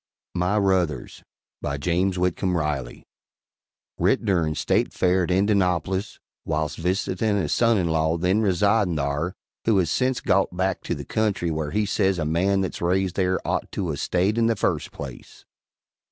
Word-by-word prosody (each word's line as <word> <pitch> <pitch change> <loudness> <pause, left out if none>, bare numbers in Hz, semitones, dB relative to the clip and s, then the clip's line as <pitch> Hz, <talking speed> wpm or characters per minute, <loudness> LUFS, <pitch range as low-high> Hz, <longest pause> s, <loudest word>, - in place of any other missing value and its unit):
MY 90 +3 +1
RUTHERS 90 -9 0 0.4
BY 70 -1 -2
JAMES 90 +5 0
WHITCOMB 90 0 0
RILEY 75 -6 -3 1.0
[Writ - - +2
durin' 85 -6 +1
State - - +1
Fair 90 0 +2
at - - -7
Indanoplis, 95 -1 +1 0.3
whilse 75 -1 -2
visitin' 95 +4 0
a 100 - 0
Soninlaw 85 -8 +2
then 95 +5 +2
residin' 100 -1 +2
thare, 75 +5 -2 0.3
who 110 -3 +3
has 85 -4 +1
sence 130 0 +1
got 95 -2 +1
back 95 0 0
to - - -1
the - - -7
country 100 -6 0
whare 80 -1 -2
he 105 +5 0
says 95 -2 +1
a 80 - -1
man 95 +5 +1
that's 95 - -4
raised 90 +1 +1
thare 95 -1 +1
ot - - -1
to 90 -5 -2
a 70 - -4
stayed 95 +9 +1
in 115 - +3
the 115 - +2
first - - -1
place. - - -10
90 Hz, 160 wpm, -24 LUFS, 85-100 Hz, 1.0 s, who